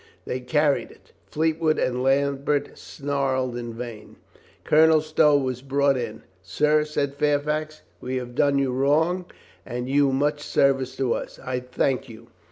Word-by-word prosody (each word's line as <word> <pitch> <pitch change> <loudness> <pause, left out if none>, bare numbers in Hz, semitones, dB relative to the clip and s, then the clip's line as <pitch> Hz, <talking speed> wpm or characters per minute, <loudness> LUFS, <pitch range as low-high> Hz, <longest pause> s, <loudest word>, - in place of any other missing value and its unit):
They 125 - -3
carried 145 +3 +1
it. - - -20 0.2
Fleetwood 160 +3 0
and 125 0 0
Lambert 140 +1 0
snarled 135 -3 -2
in 120 -1 -5
vain. 115 -2 -8 0.5
Colonel 160 +1 +5
Stow 155 -1 +3
was 130 -3 -2
brought 140 +1 +2
in. 120 -4 -5 0.2
"Sir," 150 - +1
said 145 -2 -2
Fair 145 0 +2
fax, 155 +1 -4 0.2
"we 130 +1 -4
have 125 -1 -4
done 140 +2 +2
you 135 -2 +1
wrong 155 +8 +1 0.4
and 125 0 -5
you 140 0 +3
much 145 +2 0
service 135 -3 +1
to 130 -3 0
us. - - -6
I 125 -1 -3
thank 125 +1 -1
you. 115 +1 -13
140 Hz, 155 wpm, -24 LUFS, 125-150 Hz, 0.5 s, Colonel